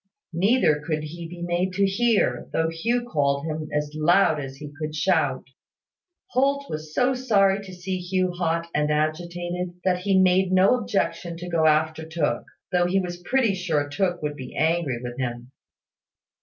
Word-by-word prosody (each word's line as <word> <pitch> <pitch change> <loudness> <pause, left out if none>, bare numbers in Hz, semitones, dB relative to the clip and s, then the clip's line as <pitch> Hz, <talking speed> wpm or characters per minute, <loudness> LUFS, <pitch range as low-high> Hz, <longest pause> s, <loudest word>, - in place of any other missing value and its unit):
Neither 175 -4 +3
could 155 0 -2
he 165 +2 -7
be 175 +1 -8
made 175 +2 0
to 200 +1 +2
hear, 225 +3 +1
though 160 0 +1
Hugh 235 +9 -1
called 140 -5 0
him 155 -1 -4
as 150 0 -2
loud 160 +1 +3
as 135 -1 -6
he 145 +1 -9
could 155 0 -4
shout. 150 -4 +1 0.9
Holt 280 +2 +1
was 155 0 -5
so 255 +1 +3
sorry 200 -6 +2
to 190 - -10
see 185 +1 -4
Hugh 185 0 0
hot 170 -1 -1
and 150 0 +1
agitated, 175 +3 -2
that 180 -1 +2
he 190 0 +2
made 185 0 +3
no 185 +4 +5
objection 170 -6 -2
to 175 +1 -7
going 160 -2 +3
after 155 +1 +1
Tooke, 160 -1 -1 0.3
though 175 -1 +3
he 190 +2 +2
was 175 -1 -5
pretty 230 +2 +2
sure 165 -6 -1
Tooke 175 +3 -1
would 150 -1 -2
be 130 -3 -9
angry 160 -5 +1
with 120 +1 -6
him. 120 0 -4
175 Hz, 170 wpm, -24 LUFS, 155-190 Hz, 0.9 s, no